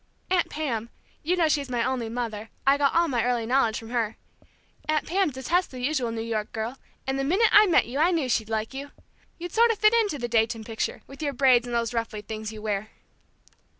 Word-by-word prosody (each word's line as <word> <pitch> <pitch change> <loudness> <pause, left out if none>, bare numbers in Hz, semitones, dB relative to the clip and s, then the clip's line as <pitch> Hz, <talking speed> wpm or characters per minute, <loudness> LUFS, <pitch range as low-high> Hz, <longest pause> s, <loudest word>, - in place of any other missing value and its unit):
Aunt 360 -2 +2
Pam 235 -7 -3 0.3
you 345 +4 +1
know 335 -2 +3
she's 285 -3 0
my 240 -2 0
only 245 -3 -1
mother, 225 -2 -4 0.2
I 275 +1 +6
got 280 +1 +2
all 340 0 +4
my 240 -6 0
early 245 -2 0
knowledge 235 -2 +2
from 225 0 -9
her! 225 -3 -1 0.7
Aunt 310 -1 +1
Pam 380 0 +1
detests 295 +7 0
the 255 - -9
usual 255 -2 0
New 225 0 -3
York 220 -2 -3
girl, 225 +4 -4 0.3
and 265 0 -1
the - - 0
minute 380 +11 +3
I 420 0 +7
met 345 - +4
you 255 +5 -4
I 330 +3 +5
knew 325 -7 0
she'd 220 -3 0
like 220 +2 -2
you. 280 +1 -6 0.5
You'd 350 0 -6
sort 465 +1 +5
of 455 - +1
fit 425 +2 +5
into 430 -9 +2
the 240 -2 -3
Dayton 225 -1 +1
picture, 220 0 -4
with 275 +2 -12
your 285 -2 -1
braids, 255 -2 +4
and 240 - -3
those 235 0 0
ruffly 225 -2 -3
things 215 +1 -6
you 215 -1 -9
wear!" 210 0 -2
250 Hz, 225 wpm, -26 LUFS, 225-310 Hz, 0.7 s, I